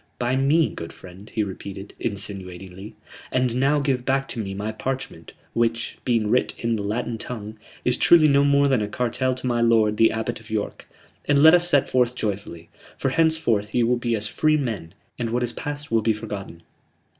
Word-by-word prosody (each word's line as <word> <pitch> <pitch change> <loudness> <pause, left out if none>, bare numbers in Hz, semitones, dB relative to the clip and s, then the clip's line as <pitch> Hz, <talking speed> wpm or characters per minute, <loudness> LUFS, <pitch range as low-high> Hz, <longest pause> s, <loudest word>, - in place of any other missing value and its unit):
By 125 +1 0
me, 145 +4 +3
good 85 - -7
friend," 95 +3 -13
he 110 - -1
repeated, 100 0 -7
insinuatingly. 95 -1 -5 0.4
"And 125 -2 +1
now 140 +3 +3
give 135 -3 0
back 135 +1 0
to 120 - -5
me 95 -3 -4
my 105 +2 -3
parchment 130 +4 -5 0.2
which, 115 0 0
being 115 -4 +1
writ 125 - +1
in 115 -1 -1
the 105 - -3
Latin 115 +3 -3
tongue, 110 -3 -6 0.3
is 125 0 +2
truly 165 -3 +6
no 140 -1 +4
more 140 0 +4
than 130 -5 +2
a 105 - -1
cartel 125 +3 -1
to 130 - -7
my 120 -1 +1
lord 110 -2 +3
the 115 - +5
Abbot 110 +1 -3
of 115 0 -16
York 110 -1 -4 0.4
and 145 0 +3
let 160 +1 +9
us 175 0 +4
set 140 -4 +3
forth 125 -1 +1
joyfully. 95 -7 -4 0.3
For - - 0
henceforth 140 -11 +1
ye 120 - +3
will 120 +2 +3
be 120 -1 -1
as 105 -1 -2
free 155 +8 +2
men, 105 - -4 0.2
and 120 -1 -1
what 120 +2 0
is 120 - -2
past 145 -1 -6
will 115 -1 +3
be 110 +1 +2
forgotten." 105 -6 -7
115 Hz, 200 wpm, -23 LUFS, 105-130 Hz, 0.4 s, let